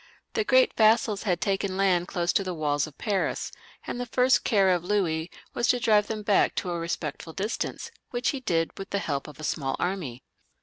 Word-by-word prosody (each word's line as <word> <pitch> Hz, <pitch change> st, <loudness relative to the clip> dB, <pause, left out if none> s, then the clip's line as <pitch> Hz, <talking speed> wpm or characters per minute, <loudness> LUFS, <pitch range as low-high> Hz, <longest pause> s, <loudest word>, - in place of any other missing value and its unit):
The 440 Hz, -, +1 dB
great -, -, +4 dB
vassals 220 Hz, -1 st, +4 dB
had 180 Hz, -, +2 dB
taken 195 Hz, -1 st, -1 dB
land 180 Hz, -3 st, +2 dB
close 175 Hz, -3 st, 0 dB
to 195 Hz, -, +2 dB
the 185 Hz, -2 st, -4 dB
walls 145 Hz, -2 st, 0 dB
of 150 Hz, -, -14 dB
Pans, 200 Hz, -3 st, -1 dB, 0.3 s
and -, -, -4 dB
the 245 Hz, -, -3 dB
first 255 Hz, +2 st, +3 dB
care 195 Hz, -4 st, +3 dB
of 175 Hz, -2 st, +2 dB
Louis 175 Hz, -4 st, 0 dB, 0.2 s
was 240 Hz, -, 0 dB
to 245 Hz, -, +3 dB
drive 215 Hz, -4 st, +3 dB
them 215 Hz, -1 st, -4 dB
back 205 Hz, -1 st, +3 dB
to 180 Hz, -, -2 dB
a 170 Hz, -, -2 dB
respectful 165 Hz, -1 st, -4 dB
distance, 215 Hz, -, -3 dB, 0.2 s
which 245 Hz, 0 st, 0 dB
he 275 Hz, -, -2 dB
did 165 Hz, -9 st, 0 dB
with 195 Hz, -, -6 dB
the 200 Hz, -, -1 dB
help 145 Hz, -8 st, -2 dB
of 150 Hz, -1 st, -12 dB
a -, -, -8 dB
small 135 Hz, -3 st, -1 dB
army. 165 Hz, -10 st, -3 dB
195 Hz, 210 wpm, -27 LUFS, 165-220 Hz, 0.3 s, great